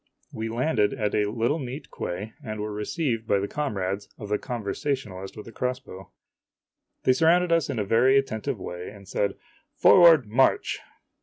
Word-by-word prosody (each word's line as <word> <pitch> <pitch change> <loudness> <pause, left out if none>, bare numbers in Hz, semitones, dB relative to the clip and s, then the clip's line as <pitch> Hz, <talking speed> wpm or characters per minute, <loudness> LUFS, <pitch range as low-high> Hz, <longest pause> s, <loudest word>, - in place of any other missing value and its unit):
We 110 0 -4
landed 120 -1 +1
at 105 -5 -1
a 105 -1 +1
little 120 +8 0
neat 135 +2 -6
quay, 100 +5 -5
and 110 -3 -5
were 105 0 -3
received 115 +1 -2
by 100 - +3
the 100 +1 -1
comrades 100 -9 -3
of 105 - -8
the 105 - +1
conversationalist 105 -4 -4
with 105 - -8
the 115 - -10
crossbow. 125 -6 -5 0.9
They 130 - +5
surrounded 170 +5 +3
us 165 -3 +2
in 135 - -2
a 105 - 0
very 125 +6 +4
attentive 135 -1 -1
way 90 0 -6
and 100 -2 -14
said, 100 0 -1 0.2
" - - -38
Forward, 165 -7 +8
march 120 +6 +2
115 Hz, 170 wpm, -26 LUFS, 105-135 Hz, 0.9 s, Forward